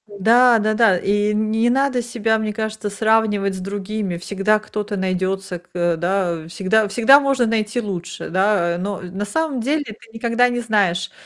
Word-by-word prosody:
Да, 230 +4 +4
да 215 0 0
да, 215 -4 +4
и 205 +3 0
не 220 +2 +1
надо 265 0 +1
себя, 225 -2 -1
мне 215 -1 -3
кажется, 220 0 -4
сравнивать 210 -1 +1
с - - -6
другими. 200 -1 -4
Всегда 200 +4 0
кто-то 210 -1 -5
найдется 190 0 -2
к 175 - -29
э, 175 -1 +1
да, 175 -1 -2
всегда 200 +5 +1
всегда 240 +6 +5
можно 275 -3 +1
найти 220 +1 -1
лучше, 180 -5 -6
да? 185 -2 +1
Но 200 +1 -4
на 185 +3 -5
самом 285 +3 -2
деле 295 +5 0
ты 215 -1 -12
никогда 235 +2 +1
не 245 0 -2
знаешь. 200 -6 0
210 Hz, 170 wpm, -20 LUFS, 190-225 Hz, -, всегда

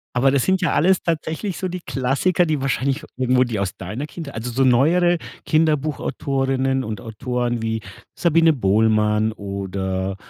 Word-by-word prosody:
Aber 135 +2 +4
das 140 - +2
sind 190 0 +2
ja 180 - +1
alles 185 +4 +3
tatsächlich 165 +3 -2
so 185 - -3
die 180 +1 -5
Klassiker, 140 +6 +1
die 155 -4 -1
wahrscheinlich 135 +2 -1
irgendwo 130 0 +3
die 115 -5 -3
aus 95 -2 -3
deiner 105 +10 -5
Kindheit 155 -3 -8
also, 115 +2 -4
so 130 +3 +1
neuere 170 +8 +4 0.3
Kinderbuch-Autorinnen 135 -3 0
und 110 -4 -5
Autoren 120 +1 -3
wie 110 0 -1 0.4
Sabine 165 -1 +4
Bohlmann 110 -1 +2
oder, 95 -1 -3
130 Hz, 150 wpm, -21 LUFS, 110-155 Hz, 0.4 s, Aber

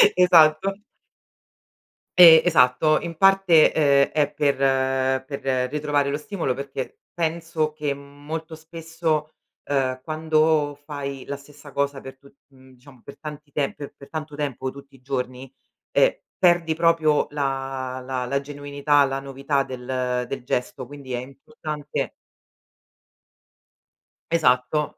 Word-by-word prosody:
Esatto. 175 0 +5 1.4
E 165 -3 +10
esatto. 155 -1 +4
In 165 -1 -7
parte, 195 -4 +5
uhm, 160 - +2 0.3
è 150 -2 +1
per 145 -1 +1 0.7
per 130 -2 -2
ritrovare 145 -1 0
lo 145 - -1
stimolo, 160 -5 -3
perché 135 -1 -6
penso 165 -2 -2
che 150 -2 -2
molto 145 +3 -8
spesso, 160 -1 -3 0.4
uhm, 130 -2 0
quando 155 -2 +1
fai 140 -3 -6
la 140 - -5
stessa 145 +1 -15
cosa 140 0 -2
per 135 0 -11
tu 140 - -18 0.2
uhm, 130 -1 -19
diciamo 130 0 -18
per 140 - -12
tanti 150 -1 -9
te 140 -1 -1
pe 145 - -8
per 140 - -14
tanto 155 -2 -6
tempo 135 -3 -3
tutti 140 +1 -13
i 135 - -18
giorni, 130 -1 -4 0.4
ehm, - - +3 0.2
perdi 175 -3 +3
proprio 160 -2 +3
la 135 -2 -3
la 130 -1 -3
la 140 +3 0
genuinità, 145 0 +1
la 135 0 -2
novità 140 +1 -1
del 125 -1 -3
del 135 -2 -5
gesto, 125 +1 -3
quindi 140 -1 -9
è - - -1
importante 145 - -6 2.2
Esatto. 150 -2 +1
145 Hz, 125 wpm, -23 LUFS, 135-155 Hz, 2.2 s, E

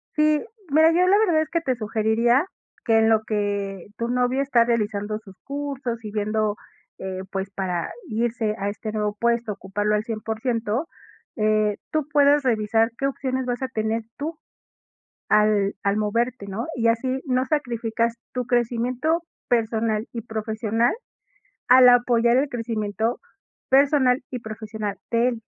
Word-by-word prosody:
Sí, 305 -1 +3 0.3
mira, 315 +3 +6
yo 360 +2 +3
la 395 +2 +5
verdad 350 -8 +3
es 315 - -10
que 335 0 0
te 260 -5 0
sugeriría 225 +4 +2 0.4
que 225 -2 +4
en 220 0 +4
lo 220 -1 +4
que 200 -3 -2
tu 235 - -2
novio 250 +2 +1
está 260 -4 +3
realizando 215 -2 -1
sus 200 -3 -15
cursos, 275 -5 -4
y 210 - -6
viendo, 215 0 0 0.4
eh, 190 -1 -5
pues, 195 0 -3
para 180 -4 -2 0.2
irse 225 -1 -1
a 200 -1 -2
este 215 +1 -5
nuevo 210 -1 -1
puesto, 235 -2 +1
ocuparlo 205 +2 -1
al 210 - 0
100%, 225 +3 -2 0.5
eh, 215 -2 +2
tú 310 -2 0
puedas 290 0 +5
revisar 225 -1 +2
qué 275 - -1
opciones 260 -1 -2
vas 245 0 -2
a 260 - -1
tener 220 -2 -2
tú 310 +3 -4 0.9
al 210 -1 +3
al 200 +1 +1
moverte, 230 +1 -1
¿no? 205 +5 -4
Y 230 -1 +1
así, 255 +3 0
no 255 -1 +1
sacrificas 235 -5 -1 0.2
tu 250 -1 -2
crecimiento 245 +7 0 0.2
personal 225 -2 0
y 235 - -5
profesional 220 +1 -1 0.7
al 250 0 +8
apoyar 240 0 +4
el 280 +1 +1
crecimiento 225 -1 -2 0.5
personal 270 -2 +4
y 250 - -4
profesional 215 -2 -5
de 235 +1 +3
él, 235 -2 -5
230 Hz, 150 wpm, -24 LUFS, 215-255 Hz, 0.9 s, al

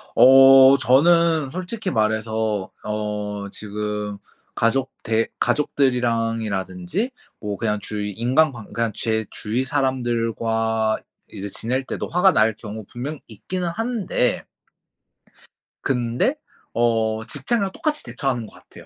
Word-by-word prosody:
어. 135 +1 +8
저는 155 +3 +4
솔직히 185 - -4
말해서 110 -2 0
어 105 -1 -3
지금 105 0 -4 0.4
가족 130 +3 +1
대 115 0 +1
가족들이랑이라든지 115 - 0 0.3
뭐 105 -2 -4
그냥 105 0 -1
주위 105 0 -4
인간관 125 +2 0
그냥 115 -1 0
제 110 -1 -1
주위 115 +4 -2
사람들과 115 -4 0 0.3
이제 100 +1 -6
지낼 125 +7 -2
때도 - - -4
화가 180 +3 +4
날 110 +1 +4
경우 110 -1 -8
분명히 140 +5 -5
있기는 175 - -4
한데 220 - -1 1.4
근데 125 - 0 0.4
어 115 -2 +1
직장이랑 190 - -1
똑같이 300 -1 -1
대처하는 125 -5 -2
거 - - -17
같아요 - - -16
115 Hz, 250 characters per minute, -22 LUFS, 110-135 Hz, 1.4 s, 어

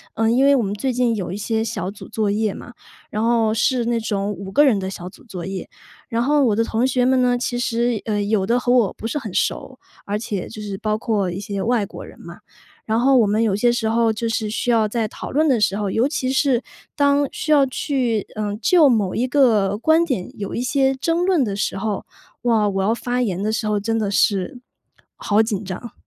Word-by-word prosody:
呃， 225 - +1
因 250 +3 +3
为 280 0 +5
我 250 - +1
们 200 -1 -2
最 235 +6 -2
近 245 -2 +1
有 190 -5 -4
一 190 - -4
些 220 +1 -1
小 210 -4 -3
组 200 - -11
作 215 -2 0
业 215 0 0
嘛， 245 - -10 0.4
然 215 +1 -1
后 230 -2 +2
是 245 +2 +1
那 235 0 0
种 205 -2 -2
5 195 -1 -7
个 290 +8 +5
人 250 -8 +3
的 190 0 -4
小 180 -2 -7
组 250 - -18
作 185 -8 -7
业。 190 0 -6 0.4
然 230 -1 0
后 290 +2 +3
我 220 -4 +2
的 230 - +2
同 230 +2 0
学 250 -1 +1
们 260 0 +3
呢， 245 -1 +2
其 245 0 -2
实， 240 -2 0
呃， 210 -2 -1
有 205 -2 +1
的 240 +2 +2
和 245 - 0
我 235 -6 +3
不 - - -10
是 235 - -3
很 220 -7 -7
熟， 260 -1 -2 0.3
而 205 +1 -2
且 210 -4 -4
就 215 - -9
是 200 -2 -5
包 215 -1 -1
括 215 -4 -1
一 175 - -5
些 200 -1 -4
外 230 -1 +1
国 - - -10
人 - - -14
嘛。 - - -11 0.5
然 220 +1 +1
后 265 +2 +4
我 230 - +5
们 210 +2 +1
有 215 -4 +2
些 240 +4 +3
时 235 -2 -1
候 225 0 +2
就 220 +2 -3
是 225 -1 -1
需 220 +3 -2
要 225 -2 +3
在 225 0 -1
讨 - - -8
论 310 +3 +2
的 260 -5 +3
时 200 -1 +2
候， 205 -2 -2
尤 225 +5 +1
其 265 -2 -1
是， 265 -3 +2 0.4
当 285 0 +3
需 - - -6
要 290 -3 +5
去， 255 -6 -1
嗯， 210 -1 -3
就 315 - +5
某 210 -6 +1
一 245 - +1
个 225 -7 +3
观 315 +8 +3
点 255 - -3
有 200 -2 -5
一 - - -2
些 270 +1 +2
争 330 +6 0
论 360 -8 +2
的 200 -3 -3
时 195 -1 -2
候， 205 0 -3 0.4
哇， 225 -3 +2
我 195 -1 -1
要 215 +3 +2
发 245 +1 -2
言 195 -6 -1
的 215 +2 -1
时 220 - -2
候 210 -1 +1
真 225 +2 -1
的 210 -3 -1
是， 200 +3 +1 0.6
好 210 +1 +2
紧 220 -3 -2
张， 195 +5 -7
225 Hz, 260 characters per minute, -21 LUFS, 205-250 Hz, 0.6 s, 为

